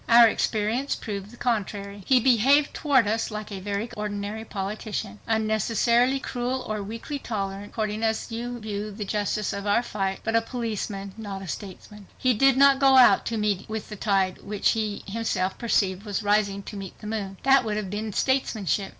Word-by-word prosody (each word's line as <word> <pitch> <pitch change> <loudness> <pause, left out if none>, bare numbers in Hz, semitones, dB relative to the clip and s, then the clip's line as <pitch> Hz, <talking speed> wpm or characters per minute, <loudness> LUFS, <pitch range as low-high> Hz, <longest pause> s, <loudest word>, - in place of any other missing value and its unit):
Our 235 0 +9
experience 225 +5 0
proved 200 -2 -6
the 240 - -14
contrary. 205 -4 -2
He 260 -2 +6
behaved 265 +4 +4
toward 265 -7 +3
us 225 +2 0
like 215 -1 -6
a 195 - -5
very 200 +3 -3
ordinary 210 0 -4
politician. 200 - -4
Unnecessarily 230 +4 +2
cruel 255 0 -3
or 215 -1 -2
weakly 230 +8 -5
tolerant, 200 -4 -4
according 215 -1 -2
as 225 +1 -1
you 240 +2 -4
view 210 -1 -4
the 210 0 -6
justice 210 +1 -1
of 200 +1 -4
our 205 +4 +3
fight, 195 -4 -2
but 225 0 -1
a 230 - +5
politician, 215 -5 -4
not 200 -3 -6
a - - -8
statesman. 200 +2 -8
He 255 -1 +2
did 270 +3 +4
not 275 0 +6
go 270 -1 +6
out 255 - +6
to 230 - -1
meet 210 -3 -1
the 220 -1 -5
tide 195 -3 +1
which 205 -1 +1
he 215 -2 -2
himself 195 -3 -2
perceived 195 -5 +1
was 210 0 -3
"rising 205 -1 +1
to 210 - -8
meet 195 -2 -7
the - - -12
moon" 205 -3 -4
That 270 0 +5
would 215 -2 -2
have 200 -3 -4
been 215 +1 -3
statesmanship. 215 -6 0
215 Hz, 185 wpm, -26 LUFS, 200-235 Hz, -, Our